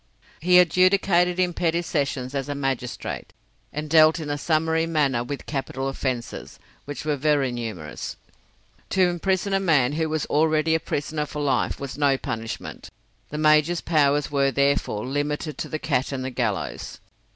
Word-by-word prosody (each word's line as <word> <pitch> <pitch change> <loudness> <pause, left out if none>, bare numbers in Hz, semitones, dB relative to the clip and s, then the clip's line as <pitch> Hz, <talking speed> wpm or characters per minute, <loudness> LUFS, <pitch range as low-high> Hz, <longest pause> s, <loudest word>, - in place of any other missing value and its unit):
He 180 +2 +5
adjudicated 180 0 +4
in 180 -1 +2
petty 170 0 0
sessions 140 -5 -2
as 140 0 -3
a 145 - -2
magistrate, 135 -3 -4 0.4
and 150 +1 -4
dealt 155 +1 +5
in 150 -2 -4
a - - 0
summary 160 +1 +1
manner 140 -7 +1
with 140 +3 -6
capital 135 -2 -3
offences, 130 -3 -4 0.3
which 145 +1 -6
were 150 -1 +1
very 145 -2 +1
numerous. 110 -11 -6 0.7
To 185 -1 +3
imprison 190 +3 0
a 195 - +3
man 150 -9 +3
who 160 +1 -1
was 155 0 -1
already 155 +1 +2
a 160 - +3
prisoner 150 0 -3
for 150 - -6
life 135 -3 0
was 140 +1 -6
no 140 -2 +3
punishment; 115 -3 -6 0.4
the 150 - -5
major's 155 +2 +3
powers 145 -3 +2
were, 140 -1 +2
therefore, 140 -6 0
limited 145 +3 -2
to - - -4
the 155 - -2
cat 140 -4 -1
and 130 -2 -3
the 130 - -3
gallows. 115 -7 -3
150 Hz, 160 wpm, -24 LUFS, 135-160 Hz, 0.7 s, He